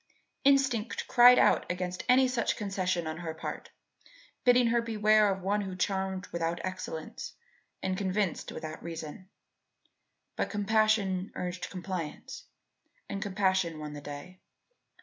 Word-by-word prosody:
Instinct 270 -5 +2
cried 245 0 +8
out - - +3
against 180 0 -3
any 260 +1 +6
such 250 -2 0
concession 185 -4 -1
on 160 0 -4
her 165 -2 -5
part, 160 - -6 0.7
bidding 245 0 +5
her 235 0 +2
beware 215 -2 +3
of 190 -1 -4
one 205 +2 +1
who 190 -2 -5
charmed 190 0 -1
without 170 0 -1
excellence 185 -4 -6 0.5
and 190 0 0
convinced 190 -1 -1
without 155 0 -7
reason. 165 +2 -7 1.1
But - - -1
compassion 205 -2 +1
urged 180 0 -4
compliance 180 -4 -6 0.6
and 195 - -4
compassion 190 -4 +1
won 150 -1 -6
the 145 - -7
day. 145 +6 -9
190 Hz, 130 wpm, -30 LUFS, 175-215 Hz, 1.1 s, cried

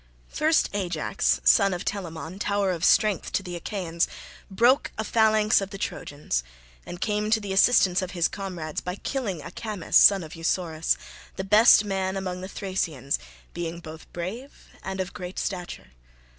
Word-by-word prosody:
First, 315 +1 +2
Ajax 190 -3 0
son 195 -4 +5
of 175 - -6
Telamon, 175 -2 -5
tower 200 -2 0
of 170 -2 -4
strength 210 -3 +3
to 195 - 0
the 180 -2 -6
Achaeans, 170 -1 -2 0.4
broke 240 +8 +3
a 220 - -1
phalanx 215 -1 +3
of 195 - -4
the 195 - -8
Trojans, 145 - -3 0.4
and 175 - -7
came 210 +1 -1
to 220 0 +3
the 200 -2 -4
assistance 195 -3 +4
of 185 - -4
his 175 -2 +1
comrades 180 -6 -5
by 180 +1 -4
killing 205 - -4
Acamas 215 -7 -7
son 195 -3 +7
of 155 - -10
Eussorus, 165 -1 0 0.4
the 190 - -4
best 210 +2 +6
man 190 -1 -2
among 180 -1 -4
the 185 - -6
Thracians, 170 -9 -2 0.3
being 170 0 -4
both 160 -2 -11
brave 215 +11 -7
and 190 0 -5
of 185 0 -3
great 180 0 -7
stature. 180 - -5
190 Hz, 160 wpm, -25 LUFS, 175-205 Hz, 0.4 s, son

